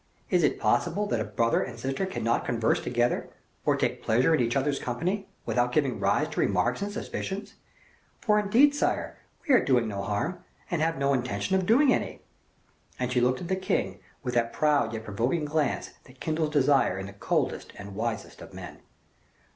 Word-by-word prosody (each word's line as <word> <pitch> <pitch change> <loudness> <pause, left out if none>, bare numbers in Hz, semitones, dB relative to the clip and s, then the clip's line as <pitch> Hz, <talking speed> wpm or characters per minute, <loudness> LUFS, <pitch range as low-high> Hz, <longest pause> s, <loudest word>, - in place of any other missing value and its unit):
Is - - +4
it - - +2
possible 210 - +1
that 120 - -1
a - - 0
brother 110 +3 +1
and 120 -2 -5
sister 135 +9 -2
cannot 115 -11 0
converse 115 -2 +1
together, 120 0 0 0.4
or - - +4
take - - -1
pleasure 125 +8 +3
in 155 - +3
each 120 +1 0
other's 140 +1 +1
company, 185 - -2 0.2
without 125 0 +1
giving 135 -3 +1
rise - - +2
to - - -5
remarks - - +1
and 200 +1 -2
suspicions? 200 0 -5 0.7
For 210 -1 +3
indeed, 235 +8 +5
sire, 290 - -1 0.3
we 285 - +4
are 250 - +6
doing 125 -4 +2
no 100 -2 -3
harm, 115 - -2 0.3
and 170 -3 0
have 165 +1 +1
no 140 0 +2
intention 125 - -1
of 190 -1 0
doing 260 +4 +5
any." - - -3 0.7
And 125 0 -2
she 125 -1 +2
looked 125 +1 +2
at 175 - -5
the 190 - +1
king 100 - -1 0.2
with 125 -2 -2
that 115 -1 +1
proud 150 -7 +2
yet 110 -1 -5
provoking 120 +9 -1
glance 150 0 -1
that 130 0 -18
kindles 155 -1 -1
desire 140 -8 +3
in 95 - -4
the 100 - -9
coldest 100 - -1
and 100 0 -8
wisest 115 +2 -4
of - - -11
men. - - -9
130 Hz, 190 wpm, -27 LUFS, 115-175 Hz, 0.7 s, are